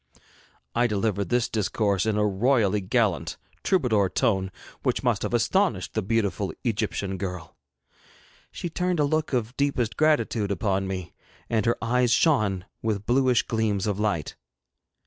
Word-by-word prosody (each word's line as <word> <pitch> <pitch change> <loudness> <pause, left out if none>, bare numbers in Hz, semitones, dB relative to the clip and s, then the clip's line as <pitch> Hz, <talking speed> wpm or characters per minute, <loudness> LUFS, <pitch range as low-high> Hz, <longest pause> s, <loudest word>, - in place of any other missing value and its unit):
I 120 +1 +3
delivered 100 -2 -1
this 120 -1 +2
discourse 105 -1 0
in 105 -1 +1
a 105 - +2
royally 105 0 +2
gallant, 95 - 0 0.3
troubadour 115 - +2
tone 95 -6 +1 0.3
which - - 0
must - - +1
have - - -2
astonished - - +1
the - - 0
beautiful 100 -2 0
Egyptian 100 -5 -2
girl. 90 -3 -5 1.0
She - - -5
turned 180 +1 -1
a - - +4
look 155 +1 0
of 120 -1 -1
deepest 140 -5 0
gratitude 150 -9 +2
upon 95 0 0
me, 95 -2 -5 0.4
and 110 -1 +1
her 120 - +2
eyes 125 +1 +2
shone 105 - +2 0.2
with 105 -2 -2
bluish 125 -1 +3
gleams 110 -4 0
of 105 -2 -1
light. 85 -9 -1
110 Hz, 145 wpm, -26 LUFS, 100-125 Hz, 1.0 s, a